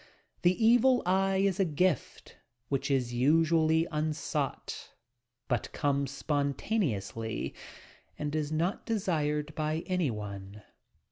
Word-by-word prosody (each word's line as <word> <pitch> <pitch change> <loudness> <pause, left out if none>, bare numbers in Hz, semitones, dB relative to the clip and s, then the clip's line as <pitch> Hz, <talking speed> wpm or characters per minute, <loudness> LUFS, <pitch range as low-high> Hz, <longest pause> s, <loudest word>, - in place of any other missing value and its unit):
The 185 +5 +3
evil 245 +2 +5
eye 190 +1 +2
is 195 -1 +1
a - - +5
gift 170 - -1 0.3
which 140 +1 -1
is 125 -3 +1
usually 160 +4 +3
unsought, 155 0 -3 0.5
but 120 -4 -1
comes 140 -1 0
spontaneously 140 - -2 0.6
and 150 0 -3
is 155 -1 -1
not 170 +7 0
desired 155 -8 0
by 155 +2 -1
any 180 -6 0
one. 100 -2 -7
155 Hz, 110 wpm, -30 LUFS, 140-180 Hz, 0.6 s, evil